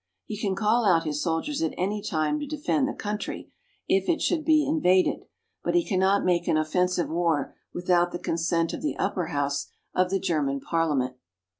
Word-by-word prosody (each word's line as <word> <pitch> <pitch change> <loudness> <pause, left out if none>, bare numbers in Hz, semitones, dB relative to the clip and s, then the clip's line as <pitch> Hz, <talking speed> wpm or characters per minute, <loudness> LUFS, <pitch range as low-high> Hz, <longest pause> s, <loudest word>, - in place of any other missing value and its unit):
He 215 - -5
can 200 -2 -1
call 215 +4 +2
out 175 -5 +4
his 150 -1 -2
soldiers 175 - -1
at 325 - -1
any 205 +3 -1
time 160 - 0
to 295 - -5
defend 295 -1 0
the 280 - -3
country, 210 0 -5 0.4
if 190 0 +2
it 335 - +2
should 320 -3 0
be 310 -1 +4
invaded; 190 - +2 0.4
but - - 0
he 345 -2 +3
cannot 195 0 +2
make 175 -1 +1
an 155 - +3
offensive 180 +3 +1
war 165 -4 0 0.2
without 175 0 +2
the - - -3
consent 165 0 0
of - - -5
the 300 - -2
upper 180 -3 -1
house 145 -2 -1 0.3
of 185 0 +2
the 195 +1 0
German 150 -7 0
Parliament. 140 -5 0
180 Hz, 185 wpm, -26 LUFS, 165-215 Hz, 0.4 s, out